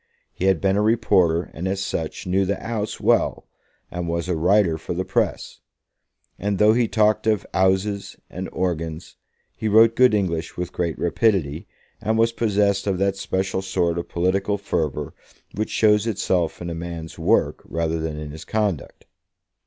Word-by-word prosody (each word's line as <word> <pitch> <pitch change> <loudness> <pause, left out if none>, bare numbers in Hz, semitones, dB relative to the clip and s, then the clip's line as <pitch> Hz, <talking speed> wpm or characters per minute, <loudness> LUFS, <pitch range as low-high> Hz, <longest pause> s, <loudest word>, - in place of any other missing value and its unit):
He 95 - -3
had 95 -3 +3
been 95 0 +1
a - - +3
reporter, 100 -7 +2
and 90 +4 -4
as 95 +1 -1
such 80 -4 -4
knew 95 +2 +2
the 100 +1 -1
"'Ouse" 110 -2 -4
well, - - +1 0.5
and 90 -1 -4
was 85 +1 -2
a 90 - 0
writer 90 0 +3
for 85 - -5
the 95 +2 -2
press. - - -1 0.8
And, 100 0 -1
though 105 +2 +5
he 120 0 +2
talked 110 0 +2
of 105 -2 +1
"'Ouses" 95 +2 +1
and 95 +1 -6
"horgans", 80 -2 -3 0.4
he 110 - -3
wrote 110 +2 +6
good 125 -3 +5
English 85 -5 -2
with 90 -1 -4
great 85 -2 -2
rapidity, 85 -3 0 0.3
and 110 +1 0
was 115 +1 +3
possessed 105 -3 +1
of 95 -2 +1
that 100 +1 +1
special 95 0 -2
sort 90 -3 0
of 85 - -6
political 95 +4 0
fervour 80 -7 -2 0.4
which 110 +1 -2
shows 105 0 +3
itself 90 -6 -1
in 85 - -4
a - - -3
man's 85 -1 -7
work - - +2
rather 80 0 -2
than 80 -1 -3
in 75 -1 -6
his 80 +1 -9
conduct. 105 -8 -2
95 Hz, 170 wpm, -23 LUFS, 85-105 Hz, 0.8 s, wrote